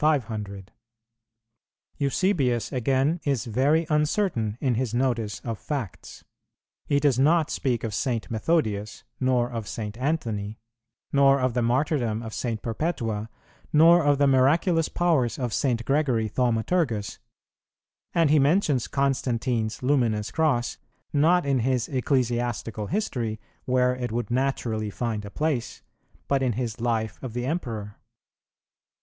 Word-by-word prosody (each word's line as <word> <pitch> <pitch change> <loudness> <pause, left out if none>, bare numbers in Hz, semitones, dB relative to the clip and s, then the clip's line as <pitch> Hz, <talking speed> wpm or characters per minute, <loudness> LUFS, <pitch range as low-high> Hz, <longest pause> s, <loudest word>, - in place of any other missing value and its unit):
500.[115:2] 110 -10 -1 1.3
Eusebius 140 - +1
again, 135 +6 +1
is 140 -5 0
very 140 +8 +2
uncertain 150 - 0
in 130 -3 +1
his 120 -1 -1
notice 115 -8 0
of 115 +1 -5
facts: 135 - -6 0.6
he 145 - +2
does 140 -4 +2
not 155 +3 +3
speak 125 -4 -1
of 110 -2 -3
St. 115 -4 -2
Methodius, 110 -5 -1 0.2
nor 125 -2 +1
of 115 -3 -5
St. 105 -2 -5
Anthony, 115 -8 -2 0.6
nor 140 0 +5
of 130 -2 0
the 125 - 0
martyrdom 120 -2 0
of 110 -1 -7
St. 115 -3 -3
Perpetua, 115 -4 -2 0.4
nor 165 +3 +6
of 145 -1 +3
the 140 - +3
miraculous 155 +5 +3
powers 160 -9 +1
of 125 -4 -3
St. 120 -4 0
Gregory 135 -6 +1
Thaumaturgus; 115 - 0 0.9
and 165 -4 +3
he 155 - +5
mentions 145 - +2
Constantine's 125 -4 -1
luminous 115 -6 +1
cross, 145 -7 0 0.3
not 165 +4 +3
in 135 -2 +2
his 125 0 0
Ecclesiastical 120 -5 -1
History, 120 - -2 0.3
where 125 0 +2
it 125 -2 -4
would 120 -1 -3
naturally 120 -4 -1
find 110 0 -3
a - - -7
place, 145 0 -2 0.4
but 140 -1 +1
in 125 -3 +1
his 120 0 -4
Life 115 -3 -1
of 130 -4 -6
the 125 0 -2
Emperor. 115 -9 -4
125 Hz, 130 wpm, -25 LUFS, 115-145 Hz, 1.3 s, nor